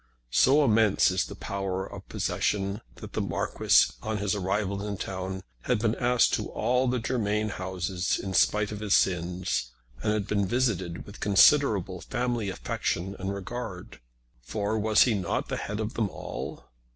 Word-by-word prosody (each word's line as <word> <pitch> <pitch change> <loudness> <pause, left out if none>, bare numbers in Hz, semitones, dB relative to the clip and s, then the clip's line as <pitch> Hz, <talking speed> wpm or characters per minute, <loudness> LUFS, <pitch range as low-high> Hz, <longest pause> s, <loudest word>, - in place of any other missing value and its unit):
So 140 - +5
immense 110 -5 +4
is 95 - +1
the - - -8
power 95 -1 -3
of - - -10
possession 100 0 -1
that - - -10
the - - -1
Marquis, - - +3
on 110 0 -2
his 100 -1 0
arrival 100 0 -1
in 100 -1 -4
town, 95 0 -4 0.2
had 125 - +2
been 110 0 +1
asked 125 0 +3
to - - -1
all 125 +1 +1
the 125 +1 +1
Germain 110 -3 0
houses 95 -1 -2
in 95 - -5
spite 105 +3 +3
of 105 - -5
his 105 -2 +2
sins, 90 -6 0 0.3
and 110 - +1
had 105 -2 0
been 100 -2 0
visited 95 -7 -1
with 100 - -12
considerable 100 -3 +4
family 120 -4 -2
affection 95 0 -2
and 95 +1 -2
regard; 100 -1 -6 0.4
for 105 - -2
was 110 0 +5
he 120 - +2
not 95 -4 -2
the - - -2
head 105 +1 -4
of 110 0 -3
them 110 -3 0
all? - - -7
100 Hz, 165 wpm, -27 LUFS, 95-110 Hz, 0.4 s, So